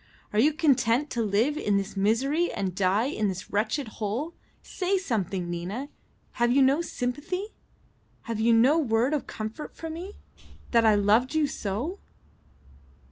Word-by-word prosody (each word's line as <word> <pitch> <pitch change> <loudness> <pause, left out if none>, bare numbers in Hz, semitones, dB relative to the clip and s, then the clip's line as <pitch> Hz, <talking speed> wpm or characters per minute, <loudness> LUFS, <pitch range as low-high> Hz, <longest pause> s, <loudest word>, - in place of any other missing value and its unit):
"Are 210 - +2
you 290 +7 +5
content 275 -3 +2
to 240 - -1
live 225 +8 +1
in 205 -7 +1
this 200 +1 -3
misery 265 - +1
and 195 -3 -2
die 195 +4 +2
in 215 -6 -1
this 190 -1 -5
wretched 220 +6 0
hole? 225 +10 -3 0.3
Say 380 +1 -1
something, 195 - -2
Nina; 185 +11 -4 0.4
have 240 0 +1
you 270 +2 +5
no 275 +5 +3
sympathy? 335 - -3 0.7
Have 230 -2 -4
you 230 +2 +3
no 250 +8 +5
word 245 -1 +1
of 295 - -2
comfort 220 +8 -6
for 325 -1 -6
me? 360 +6 -7 0.2
I - - -22 0.3
that 225 -3 +5
loved 225 +8 +3
you 310 -1 +3
so." 260 - -3
235 Hz, 155 wpm, -27 LUFS, 210-295 Hz, 0.7 s, you